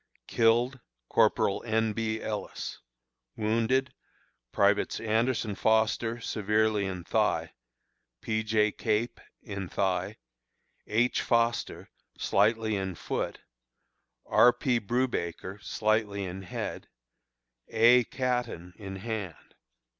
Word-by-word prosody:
Killed: 120 +3 +2 0.3
Corporal 100 - +2
N. 110 -1 +1
B. 110 0 -2
Ellis. 105 -2 -5 0.6
Wounded: 115 +5 +1 0.6
Privates 100 0 +2
Anderson 115 0 0
Foster, 110 +3 +1
severely 110 -1 +1
in 90 -2 -5
thigh; - - 0 0.7
P. 110 0 -1
J. 110 -1 +2
Cape, 110 +2 -1 0.2
in 100 -4 -5
thigh; 95 -2 -1 0.7
H. 115 +4 +2
Foster, 115 -1 0 0.3
slightly 110 +1 +2
in 95 -2 -3
foot; - - -3 0.8
R. 125 - +6
P. 125 -1 0
Brewbaker, 105 -5 -2
slightly 105 -2 0
in 95 +1 -5
head; 95 - -5 0.8
A. 120 +2 +5
Caton, 125 -10 -2
in 95 -2 -7
hand. 100 -5 -6
110 Hz, 95 wpm, -29 LUFS, 100-115 Hz, 0.8 s, R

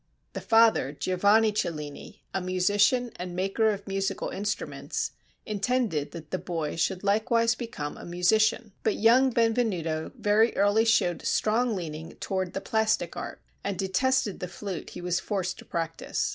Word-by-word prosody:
The - - -5
father, 225 - +4
Giovanni 205 +7 +3
Cellini, 150 -8 -5
a 190 - -1
musician 205 +7 +2
and 180 0 -6
maker 195 +4 +1
of 200 -1 -3
musical 195 0 -2
instruments, 205 +2 -3 0.3
intended 215 - 0
that 160 -3 -10
the 185 - -1
boy 165 -4 -3
should 180 +3 -1
likewise 230 +3 +2
become 185 - -6
a - - -10
musician; 215 +6 +2
but 220 - +1
young 245 +4 +5
Benvenuto 220 -10 0
very 215 +3 +3
early 205 +3 +4
showed 180 -6 +2
strong 225 +1 +1
leaning 160 -3 -6
toward 190 -2 -3
the 195 - -3
plastic 220 0 0
art, - - -6 0.2
and 200 -2 -2
detested 215 +3 +1
the 180 - -4
flute 180 +1 -6
he - - -8
was 175 0 0
forced 190 -2 -3
to - - -11
practice. 165 -1 -2
200 Hz, 150 wpm, -27 LUFS, 180-220 Hz, 0.3 s, young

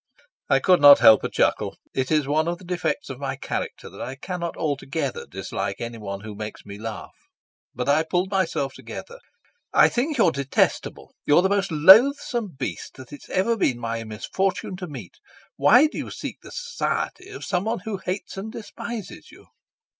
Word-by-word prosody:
I - - +5
could 180 -4 +3
not 145 -1 +10
help 110 -1 +7
a - - -1
chuckle. - - 0 0.2
It 130 -1 -1
is 150 -3 +2
one 155 +3 +1
of 175 0 -1
the 185 - -16
defects 180 - -2
of 130 - -8
my 140 -1 -3
character 135 - -5
that - - -11
I 130 - -5
cannot 170 +3 -5
altogether 155 - -3
dislike - - -4
anyone 105 -4 -6
who 110 0 -8
makes 105 +1 -8
me 100 0 -9
laugh. 110 -1 -7 0.6
But 125 +2 -3
I 145 +2 +4
pulled 180 +4 -1
myself 165 -8 0
together. 485 +1 -9 0.5
"I - - +6
think 280 +5 -1
you're 185 -8 +4
detestable. 140 -2 -1
You're 150 +5 +5
the 190 - +2
most 200 -2 0
loathsome 215 - +5
beast 130 - -5
that 130 0 -12
it's 145 - -12
ever 215 +5 +1
been 135 - +1
my 115 -1 -3
misfortune 185 - -2
to 180 -1 -6
meet. 125 - -10 0.4
Why 245 +7 +6
do 310 - -3
you - - -5
seek - - -6
the - - -12
society 475 -5 -3
of 400 - -8
someone 210 +6 -1
who 215 -3 -3
hates 190 +1 -5
and 210 +3 -5
despises 230 0 -8
you?" - - -17
170 Hz, 180 wpm, -24 LUFS, 135-205 Hz, 0.6 s, not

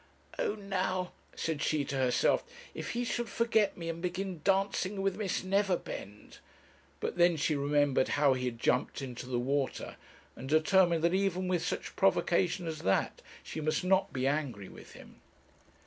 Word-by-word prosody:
'Oh, 205 - 0
now,' 185 -3 -2 0.2
said 160 -2 -2
she 155 -2 +1
to 140 - -4
herself, 130 -2 +2 0.3
'if - - -5
he 240 +1 -1
should 240 -1 -2
forget 220 -2 +1
me 165 -1 -6
and 165 0 -4
begin 180 -1 -3
dancing 195 0 +1
with 195 - +1
Miss 205 -4 -2
Neverbend!' 185 - -2 0.6
But - - -3
then 175 -1 +5
she 150 +1 +1
remembered 145 -1 +2
how 145 -2 +5
he 130 0 -2
had 120 -2 -3
jumped 125 +3 0
into 125 -1 -7
the 125 -1 -1
water, 135 +2 -2 0.4
and 130 - -8
determined 165 +2 +4
that, 170 +1 +3
even 190 -1 +1
with 180 -2 0
such - - -3
provocation 180 -1 +2
as 160 -2 -4
that, 95 -9 0 0.2
she 160 - -6
must 155 +2 0
not 190 +1 +2
be 130 0 -2
angry 135 -9 -1
with - - -13
him. - - -15
170 Hz, 165 wpm, -31 LUFS, 140-190 Hz, 0.6 s, then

